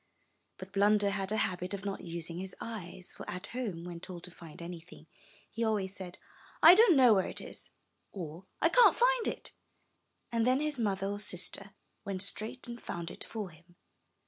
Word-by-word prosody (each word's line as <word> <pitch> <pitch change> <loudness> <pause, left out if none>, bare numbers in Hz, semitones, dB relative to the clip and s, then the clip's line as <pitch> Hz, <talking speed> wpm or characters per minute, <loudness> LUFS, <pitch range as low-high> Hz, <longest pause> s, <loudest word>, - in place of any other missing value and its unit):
But 185 +1 -9
Blunder 205 0 +4
had 195 0 -2
a 215 - +1
habit 185 -1 -1
of 195 0 -8
not 200 -1 -3
using 170 0 -5
his 190 0 -5
eyes, 185 -5 -7
for - - -8
at 180 +2 -4
home, 210 -10 -3
when 175 -1 -7
told 175 0 -8
to 180 - -8
find 165 -3 -12
anything, 170 -2 -9 0.5
he 230 - -2
always 205 -3 0
said, 185 -2 -7 0.5
*1 335 +3 +11
don't 435 -4 +7
know 250 -4 +8
where 190 -2 +2
it - - -5
is,'' - - -10 0.4
or, 175 -1 -7 0.2
*'I 330 - +6
can't - - +7
find - - +3
it," - - -4 0.8
and 230 -1 +2
then 255 +1 +4
his 300 -3 0
mother 195 -3 0
or 200 +1 -2
sister 195 0 -2 0.3
went 195 -1 -2
straight 220 +6 -2
and 235 0 -7
found 170 -1 -5
it - - -7
for 210 -5 -5
him. 170 +2 -20
195 Hz, 190 wpm, -32 LUFS, 180-225 Hz, 0.8 s, 1